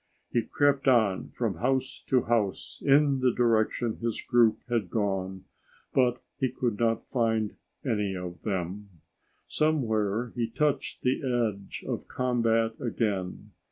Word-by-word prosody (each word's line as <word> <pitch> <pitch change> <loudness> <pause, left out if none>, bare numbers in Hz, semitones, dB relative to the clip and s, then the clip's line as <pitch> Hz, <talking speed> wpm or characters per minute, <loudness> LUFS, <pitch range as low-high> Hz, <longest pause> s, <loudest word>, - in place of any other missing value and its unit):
He 120 - +2
crept 140 +3 +1
on 110 -7 +3
from 110 -8 -2
house 130 +5 -1
to 130 -2 +3
house 115 -5 -1
in 140 -1 +4
the 130 -1 +3
direction 115 -1 +1
his 115 -1 -2
group 115 -3 +3
had 115 -6 -1
gone, 95 -3 -2 0.5
but 125 -2 +2 0.2
he 130 - +2
could 120 -4 -2
not 115 -1 +1
find 115 -4 0 0.3
any 105 -6 0
of 90 -1 -6
them. 100 0 -3 0.6
Somewhere 115 -7 0
he 120 -2 -1
touched 150 +4 -1
the 130 +1 +1 0.3
edge 100 -2 -7
of - - -3
combat 115 -3 +1
again. 105 -4 -2
115 Hz, 130 wpm, -28 LUFS, 105-125 Hz, 0.6 s, in